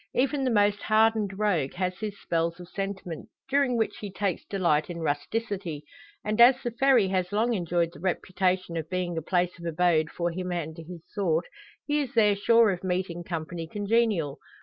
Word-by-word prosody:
Even 275 +2 +1
the 260 - +2
most 205 -2 +2
hardened 215 -2 +2
rogue 180 -10 +1
has 185 0 -2
his 210 -2 -5
spells 170 +1 -1
of 175 - -10
sentiment, 190 -3 -5 0.2
during 270 -3 +2
which 225 - -1
he 205 -2 -6
takes 195 -2 -2
delight 170 -6 +1
in 175 - -5
rusticity; 170 +1 -3 0.4
and 215 +2 +1
as 245 +2 +9
the 240 - -2
"Ferry" 240 -4 +4
has 185 -1 -1
long 225 +4 +1
enjoyed 175 -3 0
the - - -12
reputation 185 -1 -1
of 160 -1 -4
being 180 -2 -2
a 160 - -2
place 180 +1 0
of 170 - -9
abode 165 -1 +2
for 175 0 -2
him 180 +1 -4
and 160 -3 -3
his 165 0 -9
sort, 175 -5 0 0.4
he 295 0 +1
is 275 -3 -3
there 210 -3 +5
sure 230 +1 +4
of 180 -1 -5
meeting 180 -2 -2
company 165 -1 -5
congenial. 205 -7 0
185 Hz, 185 wpm, -27 LUFS, 170-215 Hz, 0.4 s, as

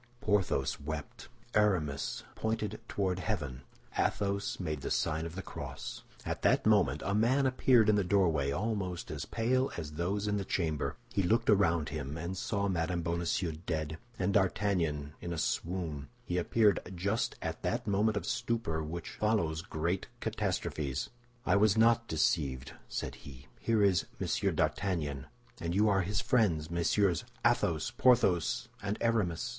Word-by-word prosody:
Porthos 95 - +1
wept; 75 0 -6 0.2
Aramis 85 -10 +1
pointed 110 -1 -2
toward 95 -2 -1
heaven; 70 -7 -3 0.3
Athos 100 -1 0
made 75 -6 -3
the - - -3
sign 80 +1 0
of 85 - -10
the 95 - -5
cross. - - -7 0.2
At - - -3
that - - +3
moment 70 +4 +3
a 100 - 0
man 120 +6 +3
appeared 130 -3 +4
in 105 - +5
the 100 - +2
doorway, 85 -7 +2
almost 95 0 -2
as - - -4
pale 130 +4 +1
as 80 -3 -5
those 95 +6 -1
in 105 0 +1
the 100 - -1
chamber. 80 -5 -1 0.2
He 100 - +2
looked 110 +4 +3
around 85 -6 +3
him 75 0 -4
and 85 +3 -4
saw 100 +1 -1
Mme. 90 -1 0
Bonacieux 85 0 -1 0.2
dead, 80 -1 -2 0.2
and 95 +1 0
D'Artagnan 90 -7 +1
in 85 - -4
a - - -4
swoon. 80 -3 -2 0.2
He 90 0 0
appeared 105 +3 +3 0.2
just 100 +6 0
at - - -4
that - - -1
moment 105 +1 +2
of - - -3
stupor 105 -9 -1
which 80 +2 -5
follows 85 -8 0
great 85 +2 -2
catastrophes. 70 -4 -2 0.3
"I 95 - +3
was 105 0 +4
not 115 +1 +4
deceived," 70 -5 0 0.2
said - - -3
he; 70 -1 -11
"here 110 -2 +2
is 95 -4 +3
Monsieur - - +1
d'Artagnan; 75 -9 -1 0.3
and 85 +1 -2
you 105 +2 +4
are 100 -1 +3
his 100 +3 -1
friends, 85 -10 +2
Messieurs 85 +1 +2 0.2
Athos, - - +2
Porthos, 105 -10 +3
and 100 +1 -2
Aramis." 110 -4 +1
90 Hz, 155 wpm, -32 LUFS, 80-105 Hz, 0.3 s, in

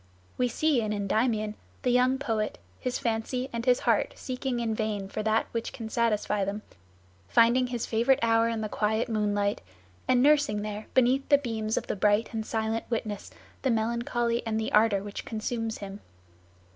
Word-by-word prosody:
We 250 - +1
see 290 0 +1
in 215 -1 -1
Endymion 215 +1 0 0.3
the 250 - +2
young 250 +2 +3
poet, 225 -6 -2 0.2
his 250 -1 -2
fancy 240 +3 -2
and 230 0 -2
his 250 -1 +4
heart - - +2
seeking 255 -1 -3
in 230 -2 -1
vain 215 -3 -2
for 200 - -4
that 220 +1 +2
which 230 -1 -3
can 225 -2 -7
satisfy 210 -3 +1
them, 200 +2 -3 0.6
finding 235 - +4
his 240 -2 -3
favorite 240 +4 +3
hour 230 0 +3
in 225 -1 -2
the 215 - -2
quiet 220 +2 0
moonlight, 205 -2 0 0.5
and 250 0 +4
nursing 285 -8 +3
there 210 0 -5
beneath 260 +2 +3
the 285 - +7
beams 225 -5 -2
of - - -1
the - - -2
bright 210 +4 +2
and 220 -1 -3
silent 225 0 -1
witness 215 -3 -3 0.3
the 265 - +1
melancholy 235 +1 0
and 220 -1 -1
the 220 - -2
ardor 210 -2 +4
which 205 0 -6
consumes 225 0 -3
him. 200 0 -8
225 Hz, 175 wpm, -28 LUFS, 215-245 Hz, 0.6 s, the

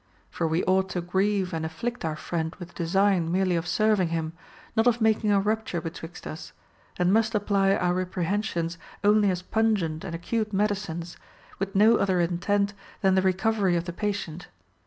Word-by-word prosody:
For 165 - -1
we 160 +2 0
ought 190 +1 +2
to 180 - -2
grieve 190 +1 0
and 160 -1 -2
afflict 230 +10 -4
our 160 -1 -1
friend 160 0 -3
with 180 0 -10
design 180 0 +2
merely 185 0 +2
of 165 +1 -2
serving 210 -1 +2
him, 165 -1 -2 0.4
not 225 +1 +3
of 240 -1 +3
making 220 -1 +2
a 200 - +4
rupture 215 -3 -1
betwixt 165 0 -8
us, 155 - -7 0.4
and 180 +1 +2
must 225 +1 +2
apply 200 -1 +2
our 175 0 +1
reprehen 185 +3 -1
sions 170 -5 -3 0.2
only 210 0 +4
as 180 -1 -2
pungent 195 -8 0
and 170 -3 -5
acute 215 +5 -2
medicines, 195 -4 -2 0.4
with 195 0 -3
no 220 +3 +6
other 190 -2 +1
intent 200 +4 +1 0.3
than 190 -1 +4
the 190 - +4
recovery 190 0 +2
of 170 - 0
the 175 - -5
patient. 180 -5 -3
190 Hz, 180 wpm, -26 LUFS, 170-210 Hz, 0.4 s, no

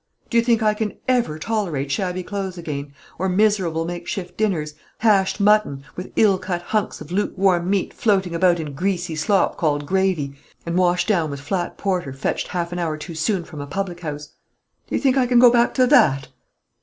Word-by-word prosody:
Do 235 - +2
you - - +2
think 230 -2 +2
I 215 0 +3
can 210 -1 -3
ever 240 -12 +1
tolerate 160 -8 -2
shabby 185 +1 -2
clothes 195 -1 -4
again, 145 -4 -5 0.3
or 190 +1 0
miserable 185 -5 +1
make 175 0 -6
shift 180 -3 -5
dinners, 170 -9 -1 0.2
hashed 205 -3 +2
mutton, 205 -10 +3
with 180 - -7
ill 200 -4 +4
cut 180 -2 -3
hunks 215 +2 -2
of 155 - -10
lukewarm 185 -2 +1
meat 195 -2 0
floating 195 -5 +1
about 175 0 +3
in 150 -3 -5
greasy 175 +1 -2
slop 190 +5 +1
called 145 -3 0
gravy, 185 -5 0 0.3
and 170 0 -2
washed 180 0 +2
down 170 -8 +1
with 140 -1 -5
flat 175 +6 -3
porter 180 -8 -2
fetched 135 - -2
half 170 -1 -3
an 175 - -3
hour 160 -3 -1
too 165 +3 -8
soon 170 +3 0
from 155 -3 -9
a 145 - -6
public 180 +3 -4
house, 150 -3 -6 0.6
do - - -3
you - - +1
think 270 -1 +2
I 255 -2 +3
can 245 0 +3
go 240 0 +8
back 240 0 +3
to 255 - +4
that? 140 - +4
180 Hz, 200 wpm, -22 LUFS, 160-205 Hz, 0.6 s, go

